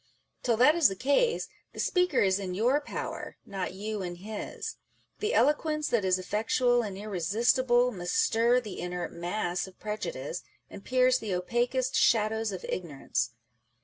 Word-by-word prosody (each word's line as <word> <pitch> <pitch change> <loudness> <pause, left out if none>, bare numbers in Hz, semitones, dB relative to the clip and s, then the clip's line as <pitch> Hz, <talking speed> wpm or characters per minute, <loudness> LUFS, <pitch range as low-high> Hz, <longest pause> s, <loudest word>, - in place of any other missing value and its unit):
Till 235 -3 +1
that 260 +6 +6
is 335 -3 +5
the 195 - -3
case, 285 - +2 0.3
the - - -10
speaker 360 -1 +2
is 190 0 +3
in 185 -2 -4
your 250 +8 +2
power, - - -5
not 190 -1 -4
you 210 +1 -4
in 175 -1 -4
his. 205 +4 -6 0.4
The 430 +3 0
eloquence 305 +1 +2
that 235 -4 +2
is 185 -1 +3
effectual 225 +6 +1
and 200 -4 -5
irresistible 235 +6 +2
must 175 -4 -4
stir 235 +2 +3
the 215 -6 -7
inert 180 0 -4
mass 175 +1 -2
of 190 - -16
prejudice, 180 -7 -4 0.3
and 195 - -10
pierce 255 0 +3
the 205 -6 -2
opaquest 245 +7 0
shadows 220 -7 +3
of 185 - -6
ignorance. 140 -8 -2
215 Hz, 155 wpm, -29 LUFS, 185-250 Hz, 0.4 s, that